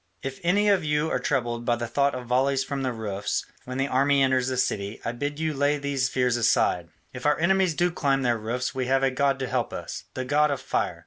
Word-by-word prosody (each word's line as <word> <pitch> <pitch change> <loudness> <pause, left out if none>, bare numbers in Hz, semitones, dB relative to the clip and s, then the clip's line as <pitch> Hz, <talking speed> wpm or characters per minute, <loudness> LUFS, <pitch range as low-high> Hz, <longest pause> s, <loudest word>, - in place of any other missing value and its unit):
If 135 0 -5
any 200 +5 +2
of 195 -4 +3
you 150 +1 0
are - - +1
troubled 120 -4 -1
by 120 0 +2
the 120 0 -3
thought 140 +4 +1
of 125 -1 -6
volleys 130 +2 +2
from 140 +1 -4
the 130 -1 -1
roofs 105 -3 -3 0.2
when 130 +1 -5
the 135 +1 +1
army 140 +1 +3
enters 130 -1 +2
the 130 -1 -1
city, 100 -3 -1
I 115 - 0
bid 145 +5 -4
you 160 -1 -1
lay 145 +1 +1
these 140 -2 -1
fears 125 -2 +1
aside: 90 -7 +2 0.2
if 125 +3 -3
our 150 - +3
enemies 185 0 +2
do 175 +2 +2
climb 135 -5 +1
their 120 -2 +1
roofs 120 +4 -2
we 130 -1 -2
have 135 +1 +2
a 135 - +3
god 135 +1 +1
to 135 -1 -3
help - - -1
us, - - -6
the 130 - -3
god 150 +3 +3
of 140 - -1
Fire. - - -2
135 Hz, 245 wpm, -26 LUFS, 125-145 Hz, 0.2 s, of